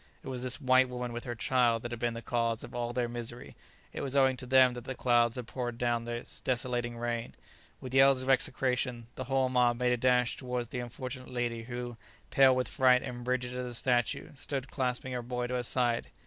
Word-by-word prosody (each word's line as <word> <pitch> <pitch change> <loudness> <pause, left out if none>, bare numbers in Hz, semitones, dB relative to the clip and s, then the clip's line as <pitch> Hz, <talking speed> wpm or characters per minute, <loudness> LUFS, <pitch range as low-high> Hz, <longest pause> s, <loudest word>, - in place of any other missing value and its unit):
It - - -7
was 125 -2 -4
this 130 +3 0
white 130 -2 +4
woman 125 -1 -4
with 120 - -6
her 120 -1 -4
child 120 -1 +2
that 120 - -5
had 120 - -5
been 120 0 -1
the 115 - -7
cause 115 -2 -1
of - - -10
all 120 0 -2
their 120 0 -1
misery, 120 0 -4 0.4
it - - -4
was 135 0 -2
owing 135 -1 +4
to 125 -2 -6
them 130 -1 +6
that 120 0 -8
the 130 - -4
clouds 120 -2 +3
had 125 -2 -5
poured 120 -1 -4
down 120 -1 0
this 120 0 -6
desolating 120 -1 -1
rain. 120 0 -3 0.4
With 130 -1 -8
yells 135 -1 +5
of - - -7
execration 125 -2 0
the 130 - -6
whole 135 0 +2
mob 125 -2 +3
made 125 0 +1
a - - +1
dash 125 0 +2
towards 125 -2 -3
the 125 - -4
unfortunate 125 +2 -6
lady 120 -2 -2
who, 120 -1 -5 0.3
pale 135 -1 +6
with 130 0 0
fright 125 -1 +4
and 120 0 -6
rigid 125 -1 -1
as 125 0 -3
a 120 -1 -5
statue, 125 +3 0
stood 140 -1 -4
clasping 130 -1 -2
her 125 - -2
boy 125 0 -3
to 125 - -4
her 125 - 0
side. 120 -1 0
125 Hz, 225 wpm, -31 LUFS, 120-130 Hz, 0.4 s, them